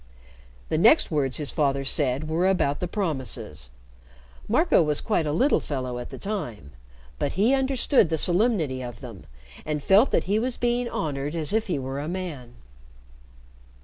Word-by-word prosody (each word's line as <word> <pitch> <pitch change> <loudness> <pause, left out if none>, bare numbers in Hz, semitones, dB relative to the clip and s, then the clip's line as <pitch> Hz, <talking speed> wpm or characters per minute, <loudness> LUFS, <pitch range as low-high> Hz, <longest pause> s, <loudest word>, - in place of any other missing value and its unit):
The 155 - 0
next 230 - +5
words 140 -4 0
his 150 -3 -2
father 140 -3 0
said 135 +1 0
were 165 +4 +1
about 145 -7 +1
the 180 - -2
promises. 130 - -4 0.8
Marco 255 - +3
was 150 -2 0
quite 175 -8 0
a - - 0
little 260 - +3
fellow 130 -4 -4
at 120 - -7
the - - -8
time, 125 - -5 0.5
but - - -1
he 215 +8 +3
understood 265 - +3
the 160 - 0
solemnity 175 - +1
of 120 0 -8
them, 115 -8 -10 0.4
and 150 -1 -3
felt 205 +7 +5
that - - +1
he 205 +3 0
was 245 +2 -2
being 240 0 0
honored 145 0 -3
as 160 +3 0
if 220 0 +1
he 175 - -1
were 135 +1 -4
a 145 - -4
man. 160 -9 -6
155 Hz, 170 wpm, -25 LUFS, 135-210 Hz, 0.8 s, next